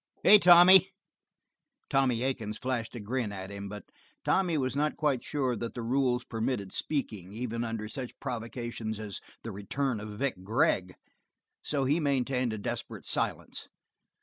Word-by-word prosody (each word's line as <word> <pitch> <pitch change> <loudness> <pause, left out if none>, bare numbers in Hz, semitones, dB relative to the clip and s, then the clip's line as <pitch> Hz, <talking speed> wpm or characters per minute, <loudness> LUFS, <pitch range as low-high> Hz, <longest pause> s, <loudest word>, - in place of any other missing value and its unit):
Hey, 210 - +9
Tommy!" 180 +1 +8 1.0
Tommy 130 -3 +2
Aiken 120 -5 -2
flashed 120 0 -3
a - - -5
grin 115 +1 -2
at 95 0 -7
him, 100 0 -6
but 105 -1 -8 0.4
Tommy 180 -4 +2
was 130 -1 -1
not 150 +2 0
quite 145 -5 +1
sure 130 -4 -1
that 115 +1 -5
the 120 - -4
rules 125 0 +1
permitted 115 -4 -3
speaking, 110 - -3
even 115 0 -3
under 115 -2 -3
such 125 +2 -7
provocation 115 -2 -4
as 105 -2 -6 0.2
the 115 - -5
return 110 +5 -2
of 105 0 -7
Vic 120 -8 -2
Gregg, 95 -3 +1 0.7
so 140 -2 -1
he 145 +5 +2
maintained 130 -4 0
a 110 - -3
desperate 100 - -5
silence. - - -2
120 Hz, 150 wpm, -30 LUFS, 110-135 Hz, 1.0 s, Hey